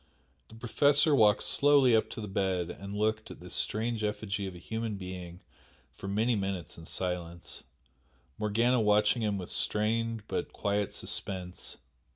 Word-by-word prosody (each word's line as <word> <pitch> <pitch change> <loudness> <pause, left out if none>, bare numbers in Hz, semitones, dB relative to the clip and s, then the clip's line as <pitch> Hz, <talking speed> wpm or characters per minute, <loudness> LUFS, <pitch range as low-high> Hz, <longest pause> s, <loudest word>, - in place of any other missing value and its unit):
The 110 - -14
Professor 140 +6 +3
walked 105 -6 +4
slowly 140 -4 +5
up 110 - +1
to - - -7
the 105 - -5
bed 95 -3 -1
and 100 +1 -8
looked 110 0 0
at - - -10
this - - -8
strange 110 0 0
effigy 105 -1 -2
of 95 - -8
a - - -9
human 110 +4 -4
being 90 -2 -8 0.5
for 95 - -9
many 110 +5 +1
minutes 95 -5 -3
in 80 - -12
silence, 85 -2 -4 0.8
Morgana 115 +4 +2
watching 105 +2 +3
him 105 -2 0
with 90 -2 -5
strained 115 +1 0
but - - -3
quiet 100 0 -1
suspense. 90 -2 -3
105 Hz, 155 wpm, -30 LUFS, 95-115 Hz, 0.8 s, slowly